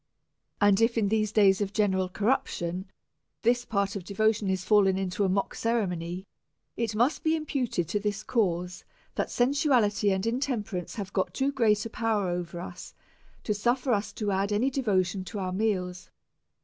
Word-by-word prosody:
And 205 0 +4
if, 230 +1 +3
in 205 -3 +2
these 215 -1 +1
days 200 -2 +4
of 200 0 -2
general 190 -3 +1
corruption, 185 -4 -1 0.5
this 245 +1 +2
part 200 -2 -1
of 200 - -4
devotion 210 +1 +1
is 190 -1 -1
fallen 195 -1 +4
into 190 +1 -1
a 195 - +2
mock 195 +1 0
ceremony, 185 -6 -2 0.5
it 225 -2 -2
must 240 +7 +2
be 320 0 +3
imputed 265 - -1
to 205 - 0
this 205 0 -2
cause, 180 -5 -1 0.3
that - - -2
sensuality 245 -6 +2
and 190 +1 -1
intemperance 230 -7 -2
have 200 -2 -6
got 190 - -1
too 275 +1 +1
great 220 -6 +2
a - - -4
power 220 -5 0
over 175 -1 -4
us 175 0 -9 0.5
to 210 - 0
suffer 245 +5 +1
us 205 0 -1
to 210 -2 -2
add 195 +2 0
any 235 +6 +2
devotion 195 -7 0
to 190 +3 -6
our 185 -2 -2
meals. 185 -3 -1
205 Hz, 170 wpm, -28 LUFS, 190-230 Hz, 0.5 s, And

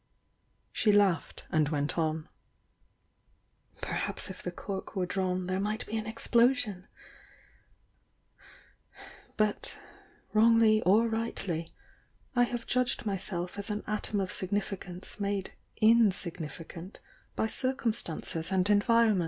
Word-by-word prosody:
She 215 - +3
laughed, 200 -6 +2
and 155 -2 +3
went 145 -1 0
on. 160 -1 -1 1.5
"Perhaps - - -3
if 185 - -10
the - - -3
cork 190 +2 -6
were 185 -2 +1
drawn 185 0 -1
there 185 +1 -1
might 210 +2 -2
be 225 - -5
an 220 -1 -2
explosion! 230 -3 +2 2.5
But, 215 -1 0 0.6
wrongly 220 0 +5
or 220 +5 +5
rightly, 200 -7 -3 0.6
I 245 0 +5
have 240 -1 -4
judged 250 -1 0
myself 190 -2 -3
as 200 +2 -5
an 210 0 -2
atom 215 -1 -1
of 190 -1 -1
significance 195 -1 -3
made 200 -1 -2 0.3
insignifi 190 -8 +2
cant 180 +3 -10 0.4
by - - +1
circumstances 220 - -1
and 185 -1 +2
environm. 220 0 +4
205 Hz, 110 wpm, -30 LUFS, 180-220 Hz, 2.5 s, wrongly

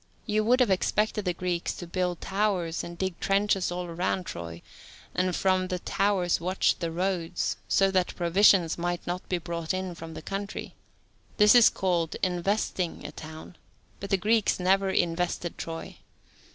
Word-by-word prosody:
You 215 -1 +1
would 250 +3 +4
have 235 -6 +3
expected 210 +2 +1
the 180 - +1
Greeks 175 -1 -2
to 175 - -8
build 180 0 -2
towers 190 -5 -1
and 170 0 -8
dig 190 -2 -3
trenches 195 -2 +1
all 180 0 -3
round 180 +2 -1
Troy, 85 0 -7 0.5
and 180 -1 0
from 185 -1 +2
the 185 - -2
towers 185 -2 +1
watch 185 +2 +1
the 170 - -2
roads, 175 -1 -1
so 195 0 +3
that 185 -2 +1
provisions 175 -1 +4
might 175 0 -2
not 180 +1 -4
be 180 - +1
brought 170 0 -3
in 185 -1 -3
from 165 -1 -9
the - - -8
country. 195 +1 -5 0.6
This 210 -1 +7
is 240 -2 +8
called 175 -4 -1
"investing" 185 0 -1
a 150 - -5
town, 160 +3 -10 0.4
but 200 - -6
the 195 - +3
Greeks 215 +2 +2
never 190 +2 +3
invested 175 -1 -1
Troy. 165 0 -7
180 Hz, 165 wpm, -27 LUFS, 170-195 Hz, 0.6 s, is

